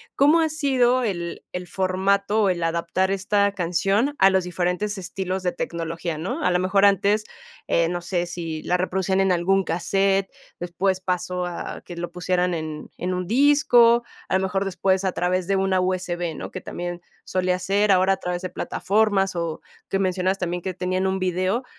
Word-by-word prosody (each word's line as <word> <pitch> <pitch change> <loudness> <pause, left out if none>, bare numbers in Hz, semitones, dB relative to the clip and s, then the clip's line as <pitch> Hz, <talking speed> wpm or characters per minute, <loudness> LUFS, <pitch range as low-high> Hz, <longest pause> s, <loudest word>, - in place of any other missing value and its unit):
¿cómo 295 +4 +5
ha 320 -1 +2
sido 260 -5 +2
el 175 -5 -3
el 180 0 -5
formato 195 +3 +1
o 195 - +3
el 175 -2 -1
adaptar 170 +3 0
esta 200 +1 +1
canción 195 +9 0
a 195 - +7
los 190 -1 +2
diferentes 180 +4 -2
estilos 185 +1 -4
de 180 -1 0
tecnología?, 165 -1 -4
¿no? 175 +5 -3
A 180 - +3
lo 180 - +2
mejor 195 +2 +3
antes, 200 +2 +3 0.4
eh, 170 0 +2
no 175 0 -3
sé, 175 0 -1
si 165 -2 -5
la 180 - +1
reproducían 190 +1 0
en 195 -1 +3
algún 190 +3 +2
casete, 195 +3 +1 0.3
después 185 +2 -1
pasó 180 0 -2
a 175 -1 -6
que 175 - -9
lo 175 0 -4
pusieran 180 0 0
en 155 -2 -5
en 180 +1 -2
un 180 -1 -3
disco, 245 -4 +5 0.3
a - - +1
lo - - -1
mejor 195 +1 0
después 190 0 0
a 185 - +1
través 180 0 -1
de 195 - +2
una 190 -1 +1
USB, 175 -3 -2
¿no? - - -7
Que 185 - -6
también 175 0 -5 0.2
solía 185 0 0
ser, 200 +3 +1
ahora 190 0 +4
a - - -3
través 180 -1 -3
de 185 - -3
plataformas 195 0 0
o 165 -2 -3 0.3
que 195 - +1
mencionas 185 0 0
también 180 -1 -3
que 185 0 -4
tenían 185 +1 -1
un 190 0 0
video, 185 +6 0
185 Hz, 185 wpm, -23 LUFS, 175-195 Hz, 0.4 s, a